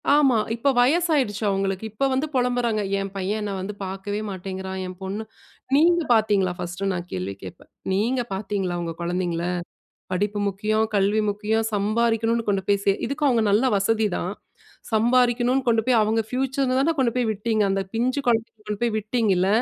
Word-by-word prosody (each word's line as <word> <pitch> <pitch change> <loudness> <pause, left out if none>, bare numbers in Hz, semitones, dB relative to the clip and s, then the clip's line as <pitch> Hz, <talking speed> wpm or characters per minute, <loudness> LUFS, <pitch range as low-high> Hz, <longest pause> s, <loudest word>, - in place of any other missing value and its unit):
ஆமா. 275 -5 +4 0.2
இப்ப 275 +4 +2
வயசாயிடுச்சு 275 - +2
அவங்களுக்கு. 195 0 -1
இப்ப 270 +6 0
வந்து 270 +4 0
பொலம்புறாங்க, 245 -3 +1 0.2
"என் 195 0 -4
பையன் 195 +3 -2
என்ன 205 -1 -3
வந்து 190 +3 -4
பாக்கவே 195 +2 -4
மாட்டேங்குறான், 190 0 -5
என் 185 0 -8
பொண்ணு, 195 +3 -4 0.5
நீங்க 340 +4 +4
பாத்தீங்களா 205 -4 +2
1 185 +3 -3
நான் 175 -1 -4
கேள்வி 95 +2 -3
கேட்பேன். 95 - -11 0.2
நீங்க 235 +6 +1
பாத்தீங்களா, 195 -2 -2
உங்க 165 -1 -3
குழந்தைகள? 175 -1 -1 0.7
படிப்பு 205 +3 -1
முக்கியம், 215 +3 0
கல்வி 200 +2 +2
முக்கியம், 215 +2 0
சம்பாரிக்கணும்னு 225 +2 +1
கொண்டு 195 -1 +1
போய் 200 -1 +2
சே" 200 - +4
இதுக்கு 295 +2 -2
அவங்க 235 -4 +3
நல்ல 210 +5 +3
வசதிதான். 200 -2 0 0.6
சம்பாரிக்கணும்னு 245 +3 +3
கொண்டு 225 -1 +3
போய் 245 -3 +4
அவங்க 220 +1 +1
பியூச்சர்னுதான 265 +3 +1
கொண்டு 250 -3 +2
போய் 250 -2 +1
விட்டீங்க, 215 +1 0
அந்த 195 0 +1
பிஞ்சு 250 +5 0
குழந்தைகள 230 -2 0
கொண்டு 210 -1 -4
போய் 235 -2 +1
விட்டீங்கல, 210 -4 +1
215 Hz, 155 wpm, -24 LUFS, 195-240 Hz, 0.7 s, ஆமா